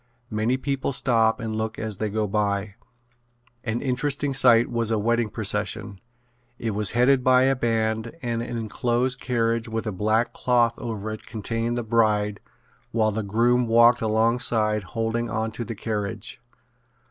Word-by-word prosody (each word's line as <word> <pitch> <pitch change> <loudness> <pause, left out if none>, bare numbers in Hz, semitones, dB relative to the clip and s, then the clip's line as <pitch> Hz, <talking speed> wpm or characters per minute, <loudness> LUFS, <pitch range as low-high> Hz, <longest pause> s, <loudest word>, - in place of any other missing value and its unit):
Many 110 +4 0
people 140 0 -2
stop 115 -3 +2
and 110 -2 -4
look 110 0 -3
as 110 -3 -4
they 110 +1 -2
go 110 +1 -1
by. 100 -1 -1 0.9
An 115 -1 -2
interesting 140 +2 0
sight 120 -3 +5
was 115 -2 -1
a 110 - +1
wedding 115 +1 +1
procession. 105 -2 -2 0.6
It 115 - -2
was 105 0 0
headed 125 +1 +4
by 130 0 +5
a 135 +1 +3
band 110 -2 -1
and 115 -1 -1
an 120 0 -4
enclosed 120 +3 -1
carriage 115 -2 0
with 115 +1 -3
a 110 - -2
black 110 +5 0
cloth 120 -2 +2
over 110 -3 -4
it 110 - -8
contained 115 +2 -3
the 120 - -2
bride 105 -2 +1 0.5
while 110 -2 +2
the 110 +2 -2
groom 120 +4 +2
walked 115 +1 +5
alongside 110 -1 +1
holding 115 +3 -2
on 110 0 -2
to 120 +2 -5
the 115 0 -6
carriage. 105 +3 -4
115 Hz, 160 wpm, -24 LUFS, 110-120 Hz, 0.9 s, sight